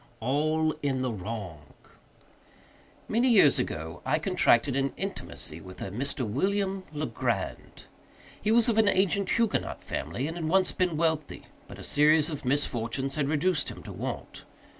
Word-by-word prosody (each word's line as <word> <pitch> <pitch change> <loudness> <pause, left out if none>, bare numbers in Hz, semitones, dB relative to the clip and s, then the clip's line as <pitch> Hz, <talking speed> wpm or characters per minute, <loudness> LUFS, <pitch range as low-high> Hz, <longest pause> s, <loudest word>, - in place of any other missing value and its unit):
—All 155 +6 +1
in 135 -2 0
the 130 -1 -1
Wrong. 100 -5 -5 1.5
Many 240 +4 +2
years 195 - +6
ago, 80 +2 -4
I 150 +3 +1
contracted 150 -7 +3
an 135 0 0
intimacy 195 - -6
with 95 +2 -11
a 95 - -5
Mr. 130 +3 -3
William 195 - 0
Legrand. 155 0 -3 0.6
He 215 - -1
was 230 +1 +6
of 225 -2 +3
an 220 - +5
ancient 200 0 +2
Huguenot 230 -2 0
family, 85 - -3
and 165 +2 -4
had 160 -2 -2
once 190 +1 +3
been 180 -4 0
wealthy; 160 -2 -1 0.2
but - - -10
a - - -9
series 155 +2 +4
of 145 -3 -6
misfortunes 130 -1 -1
had 145 -2 0
reduced 155 +1 +1
him - - -9
to - - -8
want. - - -6
150 Hz, 155 wpm, -28 LUFS, 125-185 Hz, 1.5 s, years